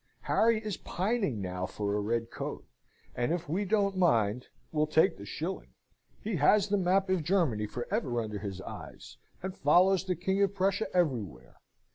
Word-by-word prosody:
Harry 230 0 +3
is 210 -4 -3
pining 195 - -1
now 90 -1 -3
for 100 -1 -3
a - - +1
red 115 +2 -1
coat, - - -5 0.5
and 120 +4 -1
if 170 -2 -2
we 180 +8 0
don't 200 -1 +1
mind, 125 - +2 0.2
will 155 -1 +1
take 160 +4 +3
the 100 - -10
shilling. 170 - -5 0.5
He 210 -3 -1
has 205 +7 +4
the 205 - +2
map 190 +2 +2
of 185 -4 +1
Germany 145 - +1
for 120 +3 -5
ever 125 - 0
under 105 -2 -4
his 95 -2 -6
eyes, - - -10 0.3
and 190 0 -4
follows 180 +6 +4
the 185 -1 0
King 190 +4 0
of 200 0 +2
Prussia 195 +2 +1
everywhere. 130 - -1
170 Hz, 175 wpm, -30 LUFS, 115-195 Hz, 0.5 s, has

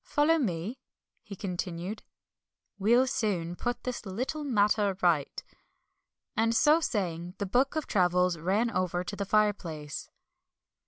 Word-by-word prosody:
"Follow 320 +3 +2
me," 200 - -2 0.4
he 200 - -9
continued, 180 +1 -4 0.8
"we'll 235 +6 +4
soon 185 -9 -1
put 245 +6 -3
this 250 -1 -4
little 250 +10 -3
matter 210 -6 +2
right." 160 -5 +1 0.9
And 230 0 +2
so 300 +6 +5
saying, 180 - -2
the 200 - -2
book 255 +9 +1
of 315 - -1
travels 180 -3 +2
ran 200 +8 +1
over 180 -2 -1
to 205 - -5
the 200 0 -3
fireplace. 185 -8 -1
200 Hz, 125 wpm, -29 LUFS, 180-240 Hz, 0.9 s, so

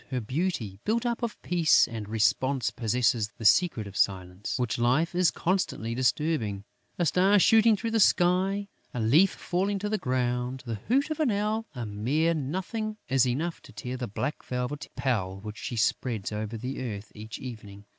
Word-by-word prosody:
Her 130 - -1
beauty, 125 - -2
built 230 +3 0
up 235 0 -1
of 235 -2 -3
peace 170 -3 +4
and 110 -3 -6
repose, 115 +3 +1
possesses 115 0 +1
the 115 - -7
secret 120 - +4
of 100 -1 -10
Silence, 95 0 -1
which 125 -2 -1
life 130 +9 +2
is 180 -1 +4
constantly 175 - -1
disturbing: 125 -5 0 0.3
a 175 - +1
star 190 +5 +4
shooting 220 +2 +5
through 225 +2 -3
the 225 - +2
sky, 190 +2 +3 0.3
a - - -1
leaf 145 - +5
falling 195 +4 -1
to 205 +2 -3
the 215 0 0
ground, 125 0 -1
the 115 -3 -4
hoot 275 +6 +2
of 310 - -3
an 305 -5 +2
owl, 215 +2 -1
a 120 -2 -4
mere 130 +11 +1
nothing 190 - -3
is 130 -1 +3
enough 160 +8 -2
to - - -14
tear 125 -1 -5
the 125 -1 -4
black 145 +9 -3
velvet 125 +3 -4
pall 100 -8 -1
which 105 +1 -8
she 120 - -4
spreads 110 -2 0
over 105 +1 -4
the 125 +4 -5
earth 105 -4 -5
each 110 +2 -8
evening. 105 -5 -9
130 Hz, 180 wpm, -28 LUFS, 110-185 Hz, 0.3 s, shooting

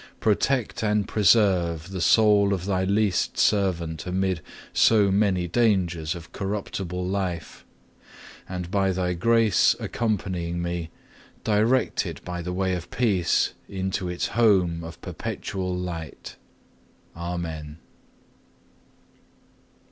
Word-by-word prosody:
Protect 115 +3 +1
and 105 -1 +1
preserve 90 -5 +2
the 95 -2 -4
soul 105 -1 +4
of 90 -1 -6
Thy 95 -2 0
least 100 -1 +1
servant 85 -5 +1
amid 95 -2 0 0.3
so 105 -3 +4
many 95 -3 +2
dangers 90 -6 +1
of 85 -2 -10
corruptible 95 -2 -4
life, 90 -4 -3 0.9
and 90 -1 -5
by 95 -2 +2
Thy 90 -1 -1
grace 115 +3 +3
accompanying 90 -6 -2
me, 85 -1 -3 0.5
direct 110 +5 +2
it - - -8
by 90 -1 -4
the 90 +1 -4
way 95 0 0
of 90 -1 -5
peace 110 -9 +1 0.2
unto 95 -1 -2
its 90 - -2
home 95 -7 +2
of 80 0 -9
perpetual 90 -1 -4
light. 85 -4 -6 0.8
Amen. 85 -3 -5
95 Hz, 110 wpm, -25 LUFS, 85-100 Hz, 0.9 s, soul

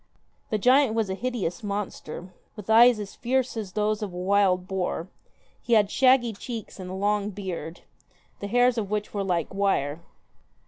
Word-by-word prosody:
The 215 - 0
giant 250 +2 +4
was 220 -4 0
a - - 0
hideous 220 -5 -3
monster, 200 -4 -5 0.2
with 210 0 -5
eyes 235 0 +7
as 205 -1 -6
fierce 255 +1 -1
as 210 -5 -5
those 210 0 0
of 205 -3 -4
a 175 - -8
wild 185 -1 +2
boar; 185 -2 -3 0.5
he 240 - -1
had 210 -3 +4
shaggy 255 -3 +4
cheeks 225 0 -7
and 185 -1 -7
a 185 - -5
long 205 +1 0
beard, 180 -5 -6 0.6
the 200 - -4
hairs 245 +2 +3
of 205 -3 -4
which 210 0 -3
were 200 -1 -1
like 175 -4 -1
wire. 170 -6 0
205 Hz, 175 wpm, -26 LUFS, 190-225 Hz, 0.6 s, eyes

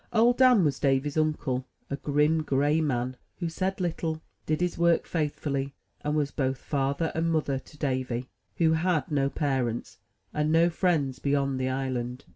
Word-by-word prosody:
Old 235 +2 +4
Dan 250 -6 +6
was 140 -3 0
Davy^s 140 +1 +1
uncle, 150 -5 0
— - - -42
a - - +1
grim, 150 +3 +2
gray 145 +2 +2
man, 130 -3 -1 0.2
who 175 - -2
said 190 +4 -2
little, 165 -3 -2 0.3
did 155 0 +1
his 180 -1 0
work 170 0 +3
faithfully, 145 -3 -2 0.3
and 150 +1 0
was 145 -2 +1
both 135 -2 -1
father 140 +4 -1
and 165 +1 0
mother 145 -4 0
to 150 - -17
Davy, 130 -3 -2 0.3
who 165 -2 +3
had 160 -3 +1
no 140 -2 +2
parents, 120 -9 -2 0.3
and 150 0 +1
no 165 +2 +4
friends 160 -7 +1
beyond 140 -2 0
the 130 0 0
island. 130 -1 -3
145 Hz, 170 wpm, -28 LUFS, 135-160 Hz, 0.3 s, Dan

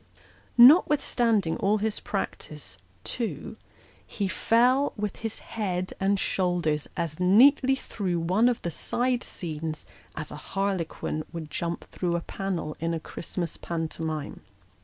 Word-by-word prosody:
Notwithstanding 240 - +5
all 205 +2 +2
his 215 0 -1
practice, 150 - -5 0.3
too, 215 - -4 0.5
he 200 -3 -2
fell 250 +8 +3
with 210 -1 -3
his 225 -1 -4
head 185 -4 -3
and 195 0 +2
shoulders 175 -7 0
as 165 -2 -2
neatly 260 +9 +6
through 190 -9 -3
one 185 +9 +3
of 245 - -2
the 170 - -2
side 245 +9 -1
scenes, 155 -2 -5 0.3
as 155 -1 -5
a - - -6 0.2
harlequin 185 -5 -1
would 160 -3 -7
jump 170 0 -3
through 175 -2 -2
a 170 - -1
panel 175 -5 -3
in 165 +1 -1
a - - -2
Christmas 170 +1 -5
pantomime. 160 -2 -4
185 Hz, 130 wpm, -27 LUFS, 165-220 Hz, 0.5 s, neatly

